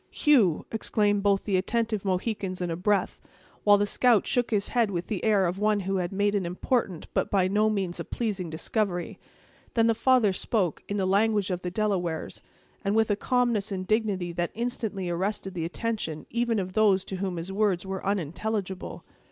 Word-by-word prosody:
"Hugh!" 235 - +3
exclaimed 205 -2 +1
both 200 -1 +2
the 195 -3 +1
attentive 220 +2 -1
Mohicans 190 0 -2
in 175 -2 -2
a - - -1
breath; 200 +3 0 0.4
while 205 -1 +6
the 205 - +2
scout 230 0 +3
shook 245 -3 +1
his 210 -2 0
head 235 -3 +2
with 175 -3 -3
the 210 -5 -4
air 210 -4 +3
of 180 +2 -2
one 210 -1 +2
who 195 +1 -1
had 175 -1 -2
made 205 +1 +1
an 200 -2 +1
important 180 +1 -1
but - - 0
by 190 -2 +2
no 210 +3 +2
means 190 -5 -2
a - - -2
pleasing 200 -7 -3
discovery. 175 +2 -2 0.6
Then 225 -1 +4
the 230 - +4
father 230 -3 +3
spoke, 185 -3 -1
in 205 - -1
the 190 - +1
language 205 0 +2
of 180 0 -2
the 180 - -3
Delawares, 180 -5 -2 0.4
and 200 +1 0
with 220 -1 +3
a - - +3
calmness 235 -3 0
and 185 -1 -3
dignity 200 -4 0
that 175 0 -1
instantly 220 -5 -3
arrested 190 +2 -2
the 165 -3 -3
attention 180 -4 -3
even 235 -1 0
of 185 -2 -3
those 200 -3 +3
to 190 - -5
whom 185 -2 -3
his 170 +3 -5
words 195 -3 +1
were 190 0 -4
unintelligible. 195 +1 -3
200 Hz, 195 wpm, -27 LUFS, 185-215 Hz, 0.6 s, while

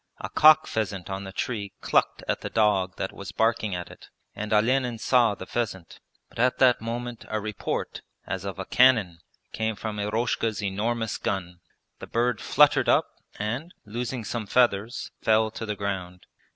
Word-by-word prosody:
A - - -5
cock 155 0 +7
pheasant 100 -4 -3
on 95 0 -4
the 95 - -7
tree 100 -1 -3
clucked - - +1
at - - -1
the - - -4
dog 100 -4 +2
that 95 - -3
was 100 - -8
barking 110 -3 +1
at 90 0 -6
it, - - -14 0.3
and 105 +1 -5
Olenin 120 +3 +2
saw 120 -2 +3
the 95 - -8
pheasant; 95 -8 -4 0.3
but - - -13
at 125 +2 +3
that 125 -3 +4
moment 120 +1 -5
a 110 - -2
report, 105 -1 -4 0.2
as 95 0 -4
of 100 -1 -5
a 95 - -5
cannon, 110 -10 +4 0.3
came 110 0 -1
from 105 0 -5
Eroshka's 110 0 -1
enormous 110 +3 -1
gun, 90 -3 -3 0.4
the - - -8
bird 120 -1 0
fluttered - - +4
up - - +4 0.3
and, 125 +11 -4
losing 120 +3 -4
some 110 0 -4
feathers, 120 +3 +1
fell 110 0 +3
to 110 - -6
the 105 - -2
ground. 95 -3 -4
110 Hz, 170 wpm, -26 LUFS, 100-120 Hz, 0.4 s, cock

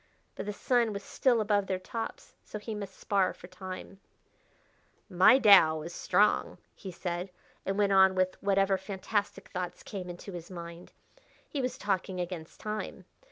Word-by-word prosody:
But - - -6
the - - -1
sun 235 0 +1
was 200 0 -5
still 245 +1 +2
above 205 -2 +1
their 190 - 0
tops, 225 +5 -6
so - - -7
he 215 +1 -6
must 200 -2 -7
spar 195 -2 +1
for - - -12
time 185 +1 -8 1.1
"My 185 +7 +6
Tao 190 - +7
is 170 +2 -7
strong," 205 +5 +2 0.2
he 190 - -8
said, 175 +1 -4 0.4
and 195 +1 0
went 205 -1 +3
on 190 0 +6
with 185 0 +2
whatever 195 -1 +2
fantastic 200 +1 -3
thoughts 180 -2 -5
came 185 -4 -6
into 175 +3 -8
his 170 -2 -8
mind. 170 -1 -9 0.6
He 285 - -3
was 250 0 -2
talking 190 -2 -1
against 175 -2 -6
time. 215 0 -5
195 Hz, 160 wpm, -30 LUFS, 180-205 Hz, 1.1 s, Tao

